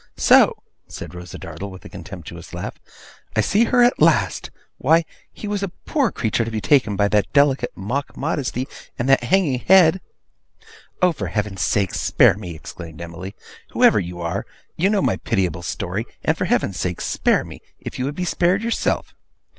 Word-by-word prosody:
'So!' -, -, +5 dB, 0.3 s
said 85 Hz, 0 st, -8 dB
Rosa 90 Hz, -2 st, -9 dB
Dartle, 100 Hz, -, -7 dB
with 95 Hz, -1 st, -12 dB
a -, -, -9 dB
contemptuous 85 Hz, -3 st, -9 dB
laugh, -, -, -6 dB, 0.6 s
'I 110 Hz, -, +4 dB
see 205 Hz, -, +3 dB
her 245 Hz, +1 st, +4 dB
at 245 Hz, -, +3 dB
last! -, -, +3 dB, 0.3 s
Why, 165 Hz, +1 st, +4 dB, 0.3 s
he 210 Hz, -, -8 dB
was 205 Hz, -1 st, -2 dB
a 200 Hz, -, -1 dB
poor 260 Hz, -, -1 dB
creature 115 Hz, 0 st, 0 dB
to 115 Hz, -, -4 dB
be 110 Hz, -1 st, -3 dB
taken 115 Hz, -4 st, +3 dB
by 100 Hz, +1 st, +2 dB
that 105 Hz, -1 st, +1 dB
delicate 140 Hz, -2 st, +3 dB
mock 125 Hz, +9 st, -3 dB
modesty, 135 Hz, -4 st, -2 dB, 0.3 s
and 120 Hz, -, -2 dB
that 135 Hz, -2 st, +4 dB
hanging 145 Hz, -4 st, +2 dB
head!' 185 Hz, +2 st, +5 dB, 1.0 s
'Oh, 180 Hz, -, +6 dB
for 165 Hz, -, -4 dB
Heaven's 105 Hz, -3 st, -3 dB
sake, 100 Hz, -3 st, +1 dB
spare -, -, +4 dB
me!' 90 Hz, -3 st, -8 dB
exclaimed 80 Hz, 0 st, -10 dB
Emily. 85 Hz, +3 st, -8 dB, 0.4 s
'Whoever -, -, +5 dB
you 85 Hz, 0 st, -5 dB
are, 85 Hz, +4 st, -2 dB, 0.3 s
you 185 Hz, +4 st, +2 dB
know 205 Hz, -2 st, +2 dB
my -, -, +1 dB
pitiable 90 Hz, -3 st, -1 dB
story, 85 Hz, -, -3 dB, 0.2 s
and -, -, +2 dB
for -, -, -2 dB
Heaven's 95 Hz, -, 0 dB
sake 90 Hz, -1 st, -2 dB
spare -, -, +1 dB
me, -, -, -11 dB, 0.2 s
if -, -, -7 dB
you 125 Hz, -, 0 dB
would 145 Hz, +2 st, -3 dB
be 180 Hz, -, -2 dB
spared 180 Hz, +4 st, +1 dB
yourself! 230 Hz, 0 st, -1 dB
115 Hz, 180 wpm, -21 LUFS, -, 1.0 s, Oh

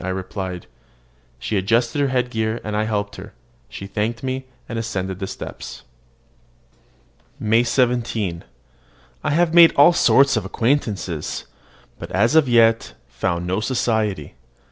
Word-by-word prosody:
I 95 Hz, -, -3 dB
replied. 95 Hz, -1 st, -5 dB, 0.7 s
She 100 Hz, -, -2 dB
adjusted 115 Hz, +7 st, +1 dB
her 140 Hz, -, +2 dB
head 125 Hz, -1 st, -1 dB
gear, 110 Hz, 0 st, -1 dB
and 105 Hz, -1 st, -4 dB
I 105 Hz, +1 st, 0 dB
helped 105 Hz, -1 st, -3 dB
her. -, -, -10 dB, 0.4 s
She 95 Hz, -, -8 dB
thanked 110 Hz, +4 st, -3 dB
me, 130 Hz, 0 st, -3 dB, 0.2 s
and 115 Hz, -, -4 dB
ascended 95 Hz, -5 st, -4 dB
the 95 Hz, -, -3 dB
steps. -, -, -8 dB, 1.6 s
MAY 110 Hz, +2 st, +3 dB
17. 115 Hz, -7 st, 0 dB, 0.8 s
I -, -, 0 dB
have 165 Hz, +2 st, +2 dB
made 170 Hz, -1 st, +7 dB
all 145 Hz, +5 st, +7 dB
sorts 140 Hz, -5 st, +4 dB
of 110 Hz, -, 0 dB
acquaintances, 100 Hz, -, -2 dB, 0.5 s
but -, -, -8 dB
have 120 Hz, +7 st, +2 dB
as -, -, -3 dB
yet 115 Hz, -1 st, +3 dB, 0.2 s
found 85 Hz, 0 st, -2 dB
no 95 Hz, +3 st, -1 dB
society. 110 Hz, -4 st, -1 dB
110 Hz, 140 wpm, -21 LUFS, 95-125 Hz, 1.6 s, made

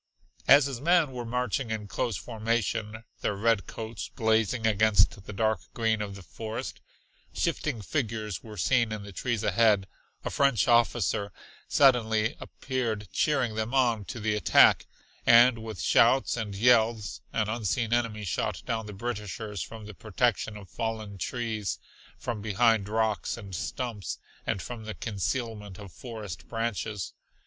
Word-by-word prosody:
As 140 Hz, 0 st, +8 dB
his 135 Hz, -3 st, -4 dB
men 170 Hz, -2 st, +4 dB
were 125 Hz, -2 st, -5 dB
marching 125 Hz, 0 st, -1 dB
in 110 Hz, -2 st, -3 dB
close 105 Hz, 0 st, -2 dB
formation, 110 Hz, 0 st, -2 dB, 0.2 s
their 105 Hz, -, -1 dB
red 110 Hz, 0 st, +1 dB
coats 110 Hz, -1 st, -6 dB
blazing 110 Hz, +1 st, +1 dB
against 105 Hz, -2 st, +3 dB
the -, -, -5 dB
dark 110 Hz, 0 st, +1 dB, 0.2 s
green 110 Hz, -2 st, +1 dB
of 100 Hz, -1 st, -4 dB
the 100 Hz, -, -10 dB
forest, 110 Hz, +7 st, -6 dB, 0.5 s
shifting 110 Hz, -, -1 dB
figures 110 Hz, -, -2 dB
were 110 Hz, -2 st, -10 dB
seen 120 Hz, +3 st, +2 dB
in 105 Hz, -1 st, -4 dB
the 100 Hz, -, -9 dB
trees 115 Hz, +4 st, -2 dB
ahead, 105 Hz, -1 st, +3 dB, 0.4 s
a -, -, -2 dB
French 140 Hz, -5 st, +3 dB
officer 115 Hz, -4 st, +2 dB, 0.4 s
suddenly 110 Hz, -5 st, +3 dB
appeared 115 Hz, -7 st, -3 dB
cheering 135 Hz, -7 st, +1 dB
them 110 Hz, +4 st, -2 dB
on 120 Hz, -5 st, +3 dB
to 120 Hz, -, -6 dB
the 110 Hz, 0 st, 0 dB
attack, 105 Hz, -, +5 dB, 0.4 s
and 120 Hz, 0 st, +7 dB
with 110 Hz, -5 st, -7 dB
shouts 130 Hz, +8 st, +4 dB
and 105 Hz, -4 st, -4 dB
yells 110 Hz, -2 st, +3 dB
an 110 Hz, -2 st, 0 dB
unseen 115 Hz, +1 st, -1 dB
enemy 115 Hz, -3 st, 0 dB
shot 95 Hz, -, -2 dB
down 110 Hz, -2 st, -2 dB
the 105 Hz, -, -7 dB
Britishers 105 Hz, -1 st, -4 dB
from 110 Hz, -2 st, -7 dB
the 105 Hz, -, -8 dB
protection 110 Hz, +1 st, -1 dB
of 100 Hz, -2 st, -11 dB
fallen 110 Hz, -3 st, -4 dB
trees, 110 Hz, -4 st, -2 dB, 0.4 s
from 115 Hz, -3 st, -4 dB
behind 105 Hz, 0 st, +2 dB
rocks 110 Hz, 0 st, 0 dB
and 100 Hz, -4 st, -9 dB
stumps, 110 Hz, +3 st, -4 dB, 0.3 s
and 95 Hz, -, -1 dB
from 115 Hz, -3 st, -7 dB
the 110 Hz, -2 st, -5 dB
concealment 105 Hz, 0 st, -3 dB
of 100 Hz, -3 st, -10 dB
forest 105 Hz, -9 st, -8 dB
branches. 115 Hz, -3 st, -3 dB
110 Hz, 150 wpm, -28 LUFS, 105-120 Hz, 0.5 s, As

